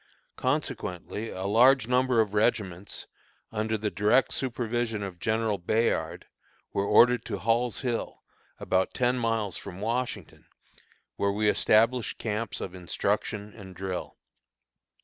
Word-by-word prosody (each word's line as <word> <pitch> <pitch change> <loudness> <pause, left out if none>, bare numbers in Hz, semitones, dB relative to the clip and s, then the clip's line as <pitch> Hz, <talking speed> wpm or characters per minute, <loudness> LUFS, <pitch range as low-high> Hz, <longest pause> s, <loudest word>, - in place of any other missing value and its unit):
Consequently 115 - -2
a 95 - -6
large 120 +4 +5
number 125 -1 +3
of 105 -2 -2
regiments, 105 -4 -1 0.5
under 110 0 -1
the 105 -1 -2
direct 105 +8 +3
supervision 120 -4 -2
of 95 -3 -7
General 110 -1 0
Bayard, 85 -4 0 0.5
were 100 0 0
ordered 120 +4 +5
to 100 - -3
Hall's 115 +3 0
Hill, 120 -4 -3 0.4
about 95 0 0
ten 125 0 +2
miles 115 -4 -1
from 90 0 -9
Washington, 120 +4 -3 0.7
where 100 - +1
we 105 +1 0
established 115 +3 +3
camps 110 +1 -3
of 90 - -5
instruction 100 +3 -2
and 95 -4 -11
drill. 95 0 -5
110 Hz, 125 wpm, -28 LUFS, 100-120 Hz, 0.7 s, large